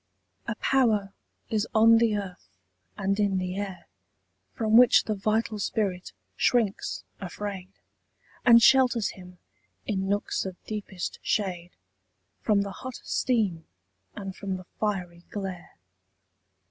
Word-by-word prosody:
A - - -2
power 215 -7 +2 0.4
is 220 0 0
on 225 +1 +7
the 225 -3 +2
earth 190 - -8 0.4
and 195 0 0
in 200 -2 +2
the 185 0 -2
air 195 -2 -5 0.7
From 220 -3 0
which 245 0 +7
the 215 - -1
vital 215 +1 -1
spirit 195 -3 -2 0.2
shrinks 225 -5 +1 0.2
afraid, 195 0 -6 0.7
And 235 -1 +7
shelters 250 -4 +5
him, 180 -1 -12 0.5
in 195 -2 -2
nooks 205 +1 0
of 190 -2 -5
deepest 205 -4 -5
shade, 180 -4 -2 0.7
From 205 -2 +2
the 200 - -5
hot 255 -1 -6
steam 205 -10 0 0.5
and 195 -1 -6
from 195 -2 -4
the 185 - -11
fiery 180 -5 -2
glare. 190 -4 -6
200 Hz, 120 wpm, -27 LUFS, 190-220 Hz, 0.7 s, on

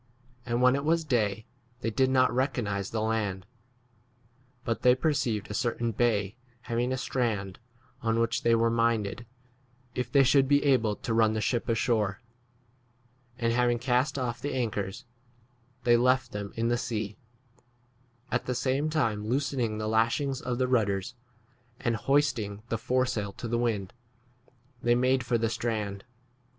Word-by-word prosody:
39 120 - -7
And 120 - +1
when 125 +1 +6
it 140 - -2
was 165 +2 +2
day 110 -6 0 0.4
they 115 - -1
did 130 +4 +2
not 130 -2 +3
recognize 120 -7 -1
the 110 -1 -2
land; 105 -4 -1 1.2
but 115 - -1
they 125 0 +6
perceived 130 -8 -1
a - - -3
certain 120 +1 -1
bay 110 -2 0 0.3
having 120 +1 -1
a 130 - 0
strand, 110 -7 -2 0.4
on 115 0 +1
which 115 0 +1
they 115 0 +4
were 115 0 +2
minded, 115 -1 0 0.7
if 125 -1 -3
they 140 +1 +6
should 135 +1 +4
be 145 +1 +3
able, 120 -7 +3
to 115 - -4
run 110 -1 +3
the - - -2
40 105 - -1
ship 120 -2 -1
ashore; 110 -4 +1 1.2
and, 115 -1 0
having 120 0 +2
cast 130 +3 +1
off 120 -2 -3
the 145 - -3
anchors, 110 -2 -3 0.8
they 120 0 +5
left 125 0 +2
[them] 105 -1 -5
in 115 +1 0
the 120 0 +1
sea, 105 -3 -3 1.2
at - - -1
the 125 - -1
same 135 +5 0
time 115 -9 0
loosening 125 -3 -1
the 110 0 -3
lashings 115 +5 +1
of 125 -1 -2
the 130 0 +1
rudders, 100 -5 0 0.7
and 120 -1 0
hoist 140 +4 +2
ing 105 0 -6
the 115 - 0
foresail 125 -5 0
to 120 - -6
the 120 +1 0
wind, 105 -6 -1 0.9
they 120 - +3
41 - - +1
made 130 +1 +2
for 120 0 +1
the 115 0 0
strand. 105 -4 -3
120 Hz, 165 wpm, -28 LUFS, 110-130 Hz, 1.2 s, when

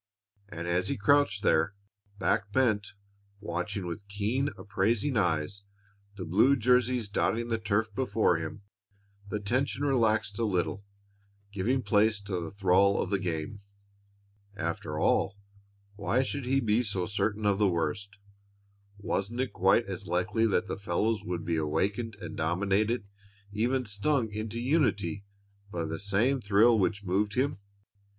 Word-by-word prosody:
And 85 -5 -6
as 90 +2 +1
he - - -1
crouched 105 -2 +3
there, 100 +5 +2 0.4
back 100 +1 0
bent, 110 -5 +1 0.5
watching 95 +1 -3
with 100 +4 -6
keen, 105 +8 -1
appraising 105 +6 0
eyes 90 -1 0 0.6
the 90 - -5
blue 110 +12 +4
jersies 125 -1 +2
dotting 115 +3 0
the 115 -1 0
turf 110 +1 0
before 105 -7 +2
him, 80 +5 -6 0.7
the 105 - -2
tension 130 +7 -1
relaxed 110 -6 +1
a - - +1
little, 95 -1 -1 0.7
giving 115 +7 0
place 105 +1 +3
to 100 -3 -3
the 85 -2 -5
thrall 100 +1 +3
of 95 - -2
the 100 - +1
game. 85 +2 -4 1.0
After 85 -2 -3
all, 100 - +1 0.6
why 105 +6 +1
should 135 -1 -4
he 135 +1 +3
be 110 0 +2
so 100 -6 -2
certain 105 +1 -1
of 100 -1 +2
the 105 -2 +4
worst? 90 +4 -2 0.8
Wasn't 105 +3 -2
it 130 -1 -1
quite 95 +5 +3
as 95 0 -6
likely 100 +6 +1
that 105 - +1
the - - -4
fellows 105 +3 0
would 90 -3 -4
be 85 -1 0
awakened 100 +9 -1
and - - -8
dominated, 100 +7 0 0.4
even 125 +5 0
stung 110 +3 0
into 110 +2 -4
unity, 120 - 0 0.5
by 85 -3 -2
the 80 +1 -4
same 110 +7 +1
thrill 110 +2 +4
which 100 +1 0
moved 100 +3 0
him? 140 -1 0
100 Hz, 145 wpm, -29 LUFS, 95-115 Hz, 1.0 s, blue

